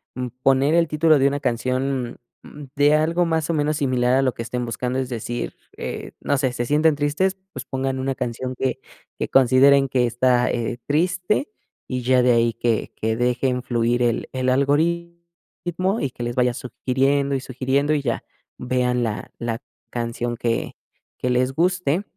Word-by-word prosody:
mm, 125 0 -3 0.2
poner 135 +3 +4
el 170 -1 +4
título 155 0 +3
de 135 - +4
una 140 +1 -1
canción, 130 0 -1 0.2
mm, 150 - -11
de 145 +1 +4
algo 165 +3 +2
más 160 -1 0
o - - +2
menos 150 -1 0
similar 125 -3 +1
a - - +3
lo 130 -2 +1
que - - -6
estén 125 +1 -3
buscando, 125 +3 -2
es 130 - -3
decir, 120 0 -4 0.2
eh, - - -5
no 145 - 0
sé, 130 -2 +1
se 120 0 -2
sienten 150 +4 +3
tristes, 155 +7 0 0.2
pues - - -6
pongan 130 0 -2
una 135 0 -1
canción 125 +1 -4
que 130 +1 -1 0.4
que - - -2
consideren 135 +2 +5
que 125 -1 +2
está 125 +1 +2
eh, 120 0 -2
triste 180 - +1 0.4
y 125 -1 -3
ya 125 +1 +4
de 125 0 +4
ahí, 115 -1 +3
que 115 -1 -1
que 110 0 -1
dejen 125 +1 0
fluir 120 0 0
el 120 -2 +1
el 130 0 0
algoritmo 170 - -1
y 140 - 0
que 120 - -7
les 120 0 -3
vaya 125 -1 +2
sugiriendo 135 +3 0
y - - 0
sugiriendo 135 +3 0
y 150 - +1
ya 120 -4 -2 0.3
vean 125 -1 0
la 110 -2 -4
la 115 -1 -2 0.3
canción 120 0 -3
que 115 -1 -2 0.4
que 125 - -2
les 125 +1 +1
guste. 180 +1 +1
130 Hz, 180 wpm, -22 LUFS, 125-145 Hz, 0.4 s, consideren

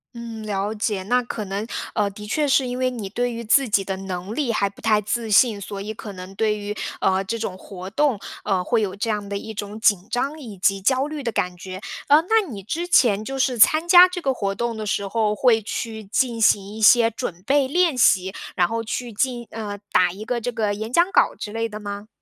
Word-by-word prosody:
嗯， 230 -2 -7
了 205 0 -2
解， 210 -3 -2
那 250 +5 +2
可 225 -3 -5
能， 200 +3 -4 0.3
呃， 205 -2 +1
的 210 +1 -10
确 295 +7 0
是 265 -1 +3
因 250 +1 -4
为 255 0 +2
你 220 -6 -6
对 245 +3 -1
于 235 0 -6
自 260 +4 +4
己 200 -2 +2
的 190 0 -4
能 190 +1 -5
力 270 -4 -1
还 200 -1 +1
不 200 - -18
太 215 -2 +3
自 220 +2 -2
信， 210 0 +4
所 200 0 -7
以 215 +2 -5
可 210 -1 -9
能 185 +1 -9
对 210 +1 0
于， 205 0 -4 0.3
呃， 190 0 +2
这 230 +4 -3
种 190 -4 -4
活 190 -1 -9
动， 275 0 +1 0.3
呃， 190 -3 0
会 230 +1 +1
有 195 -2 -2
这 225 +3 -3
样 210 -2 -2
的 200 0 -3
一 220 +2 -7
种 210 +1 -6
紧 200 -3 +2
张 280 +5 -2
以 220 -8 -9
及 195 +1 +1
焦 260 +6 +2
虑 305 -1 -5
的 235 -3 -2
感 180 -3 -1
觉。 185 +2 -8 0.3
呃， 295 +2 +6
那 430 +2 +2
你 200 -5 -7
之 335 - -3
前 215 - +4
就 270 +3 -5
是 255 -3 0
参 310 +9 +5
加 355 0 +9
这 360 -1 -6
个 270 -3 +1
活 200 -4 -2
动 235 +1 -2
的 215 - -4
时 200 0 -1
候， 210 0 0
会 225 -1 +3
去 220 +1 -5
进 235 +1 0
行 200 -2 +4
一 220 - -7
些 230 +1 +6
准 185 -6 -6
备 275 0 +3
练 340 -1 +2
习， 190 -4 +3 0.2
然 175 -2 +3
后 230 0 -3
去 240 +1 -4
进 240 +2 -1
呃， 210 -2 -5
打 180 -1 +4
一 200 +4 -8
个 240 +1 -2
这 245 - -2
个 215 -3 -1
演 220 +3 -5
讲 345 +6 +3
稿 - - +3
之 210 - -7
类 225 +1 -2
的 210 0 -7
吗？ 205 0 -7
220 Hz, 260 characters per minute, -22 LUFS, 200-245 Hz, 0.3 s, 加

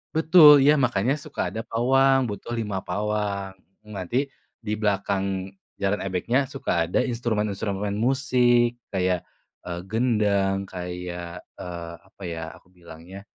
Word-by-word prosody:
Betul, 155 -4 +8
iya, 150 - +7
makanya 120 +3 +1
suka 140 - -4
ada 110 - -3
pawang, 135 +3 +3
butuh 100 +3 -7
5 105 -4 -2
pawang. 100 0 -2 0.3
Nanti 105 +6 -2 0.3
di 105 -2 -4
belakang 100 -2 -1 0.2
jaran 100 +1 -1
ebegnya 115 +9 0
suka 135 -1 -4 0.2
ada - - +1
instrumen-instrumen 105 -4 -2
musik, 120 0 +2 0.2
kayak, 90 -2 0 0.4
eee, 85 -1 -5
gendang 100 -4 +1
kayak, 90 -1 -7 0.2
eee, 85 -1 -6
apa 95 - -16
ya, 85 -1 -4 0.2
aku 90 - -26
bilangnya 85 +2 -12
100 Hz, 120 wpm, -24 LUFS, 95-120 Hz, 0.4 s, Betul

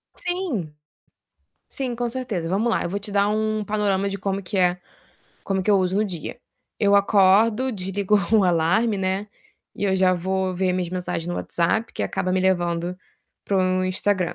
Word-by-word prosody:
Sim. 330 - -3 1.0
Sim, 255 -3 -4
com 240 0 -1
certeza. 225 -10 -3
Vamos 205 +6 +1
lá, - - +1
eu - - -3
vou 200 +2 -2
te 205 0 -7
dar 200 0 +3
um 215 0 0
panorama 200 -2 0
de 195 - -4
como 195 +1 -2
que 195 +1 -4
é 180 -1 +2 0.6
como 190 -1 -1
que 210 - +1
eu 200 - +5
uso 185 +1 0
no 215 - +2
dia. 180 +2 -6 0.4
Eu 200 -1 +3
acordo, 210 +5 +4
desligo 195 +1 0 0.2
o 210 -3 +5
alarme, 180 +6 +2
né, 190 +2 -2 0.5
e 205 - -3
eu 190 -1 +2
já 185 -1 +4
vou 185 +1 -1
ver 185 0 +1
minhas 180 -2 -1
mensagens 180 -2 -3
no 175 - -3
WhatsApp, 220 +7 -1
que - - -3
acaba 185 - -1
me 185 - +2
levando 175 -1 0 0.5
para 200 - 0
o 185 0 +1
Instagram. 185 -1 0
190 Hz, 185 wpm, -23 LUFS, 185-210 Hz, 1.0 s, eu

